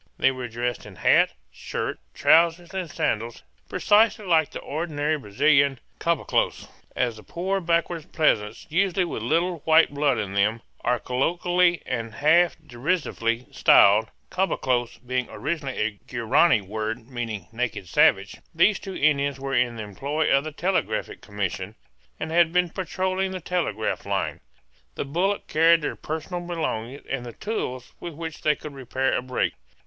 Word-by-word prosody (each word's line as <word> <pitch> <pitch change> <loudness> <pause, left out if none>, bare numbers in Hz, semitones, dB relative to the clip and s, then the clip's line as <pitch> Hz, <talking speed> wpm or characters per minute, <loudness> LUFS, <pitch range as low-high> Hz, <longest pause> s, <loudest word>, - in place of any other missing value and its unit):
They - - +4
were 130 -2 -5
dressed 120 +1 -3
in - - -12
hat, - - +4 0.2
shirt, 60 - -4 0.2
trousers, 170 +2 +3
and 185 -3 -3
sandals, 115 -3 -2 0.3
precisely 215 0 +3
like 160 -4 +3
the - - -7
ordinary 155 -1 -2
Brazilian 140 +3 +2 0.2
caboclos, 170 -2 0 0.3
as 120 -3 0
the 110 - -12
poor 190 +3 -2
backwoods 170 -1 0
peasants, 110 -9 0
usually 185 +1 +2
with 165 - -5
little 170 +8 0
white 160 0 +4
blood 140 -3 +2
in 100 -3 -3
them, 105 +3 +1 0.2
are 125 +1 +2
colloquially 175 +8 +1
and 115 -3 -4
half 170 +4 +4
derisively 125 -4 -1
styled 105 +2 +5 0.2
caboclo 130 -10 0 0.2
being 125 0 -1
originally 145 -4 -4
a 105 -2 -1
Guarany 120 +3 +3
word 110 +3 -4
meaning 115 -7 -5
"naked 115 -5 -3
savage." - - +3 0.2
These 210 - +4
two 195 -1 -7
Indians 140 -2 +1
were 135 0 -4
in 120 -2 +2
the 110 - -5
employ 140 +10 -1
of 140 - +2
the 155 - -4
Telegraphic 155 - -2
Commission, 100 0 -4 0.4
and 160 - -4
had 170 -1 +4
been 180 -1 +2
patrolling 190 +1 -1
the 185 0 -5
telegraph 165 - -2
line. - - -1 0.6
The - - -3
bullock 180 +8 0
carried 165 +1 +4
their - - -2
personal 160 +3 -5
belongings 145 -7 -4
and 135 -3 -3
the 120 -1 -8
tools 130 - -4
with 170 -3 -7
which 160 -1 -6
they 150 -1 +3
could 150 0 -9
repair 135 0 -1
a - - 0
break. 130 0 -1
145 Hz, 155 wpm, -25 LUFS, 120-170 Hz, 0.6 s, styled